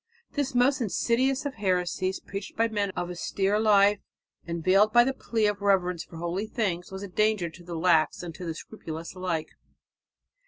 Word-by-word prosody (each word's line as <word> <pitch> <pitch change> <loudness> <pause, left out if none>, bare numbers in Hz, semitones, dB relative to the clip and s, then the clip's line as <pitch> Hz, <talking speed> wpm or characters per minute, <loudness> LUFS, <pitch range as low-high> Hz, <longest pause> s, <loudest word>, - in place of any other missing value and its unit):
This 280 -3 -2
most 255 +2 +3
insidious 255 +5 +1
of 285 - -2
heresies, 185 -2 -1
preached 195 0 -7
by 230 +1 +3
men 205 -3 -1
of 175 0 -3
austere 195 +3 0
life 205 -1 +5 0.5
and 170 -1 -4
veiled 195 +4 +5
by 240 +1 +7
the 270 +2 0
plea 225 -4 -1
of 205 -1 0
reverence 180 -4 +2
for 165 - -12
holy 175 +5 -2
things, 190 -6 -2
was 190 +1 -6
a - - -5
danger 210 -3 +1
to 175 +2 -14
the 170 0 -6
lax 165 0 +2
and 170 -2 -6
to 180 - -9
the 165 -2 -4
scrupulous 165 -4 -8
alike. 180 -4 -2
195 Hz, 185 wpm, -27 LUFS, 175-220 Hz, 0.5 s, by